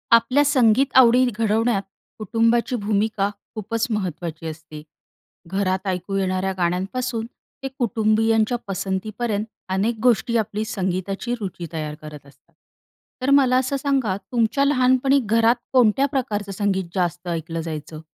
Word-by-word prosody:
आपल्या 255 +5 +3
संगीत 265 -1 +3
आवडी 250 0 +6
घडवण्यात 225 -1 +1 0.4
कुटुंबाची 230 +4 +1
भूमिका 205 -1 0 0.3
खूपच 220 +2 -2
महत्त्वाची 170 -6 -4
असते. 155 -1 -9 0.7
घरात 190 0 -1
ऐकू 185 +1 -2
येणाऱ्या 190 0 0
गाण्यांपासून 200 +7 -1 0.4
ते - - -1
कुटुंबीयांच्या 225 0 +2
पसंतीपर्यंत, 205 +3 -2 0.2
अनेक 215 +4 0
गोष्टी 235 -1 +3
आपली 215 0 -2
संगीताची 195 +2 -3
रुची 185 -4 -5
तयार 155 -2 -4
करत 150 -2 -10
असतात, 140 +4 -22 0.7
तर 255 - 0
मला 255 -2 +3
असं 265 +2 0
सांगा 265 -8 0
तुमच्या 235 +5 0
लहानपणी 265 0 +3
घरात 230 +2 +3 0.2
कोणत्या 250 +1 +4
प्रकारचं 210 -7 -2
संगीत 195 -1 0
जास्त 175 -1 -1
ऐकलं 165 -1 -3
जायचं? 155 -1 -7
215 Hz, 120 wpm, -22 LUFS, 185-240 Hz, 0.7 s, आवडी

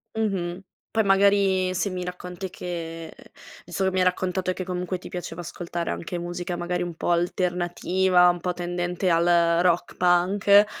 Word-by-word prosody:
Mh-mh, 190 -5 -1 0.3
poi 220 0 +2
magari 195 -1 +3
se 185 +2 -1
mi 180 -1 -4
racconti 180 +1 -6
che 165 -3 -6 0.5
insomma 190 -1 -1
mi 185 - 0
hai 185 - +4
raccontato 185 0 0
che 185 0 -5
comunque 180 0 -3
ti 180 - -11
piaceva 175 -1 -6
ascoltare 170 0 -5
anche 175 +1 -4
musica 175 0 -4
magari 175 +1 -2
un 175 -2 -5
po' 175 - -1
alternativa, 180 +1 +2
un 175 -1 +1
po' 180 +1 -1
tendente 175 +1 -2
al 165 0 +3 0.4
rock 175 -1 +1
punk, 195 +3 +4
180 Hz, 155 wpm, -25 LUFS, 175-185 Hz, 0.5 s, hai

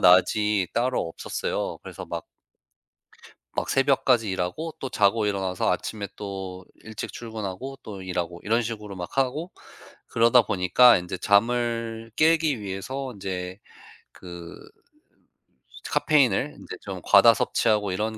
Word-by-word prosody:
낮이 95 +2 +4
따로 125 -7 0
없었어요. - - -3
그래서 - - -8
막 - - -5 1.3
막 - - -1
새벽까지 130 -4 +3
일하고 95 - -3
또 135 - -3
자고 105 -2 +2
일어나서 95 -2 0
아침에 100 -3 -3
또 95 -2 -6 0.2
일찍 110 -1 -7
출근하고 115 +3 -6
또 100 -3 -8
일하고 90 -2 -3
이런 115 +3 +1
식으로 105 -3 -6
막 90 +6 -7
하고 135 +6 0 0.6
그러다 115 +1 +5
보니까 105 +6 +5
인제 90 +1 -5
잠을 115 +2 +1
깨기 160 -5 +3
위해서 125 +7 -5
인제 95 -2 -5 0.5
그 85 -2 -10 1.3
스 - - -10
카페인을 135 -10 +2
인제 - - -9
좀 - - -6
과다 - - +7
섭취하고 105 -3 +1
이런 110 +4 -2
105 Hz, 275 characters per minute, -25 LUFS, 95-120 Hz, 1.3 s, 과다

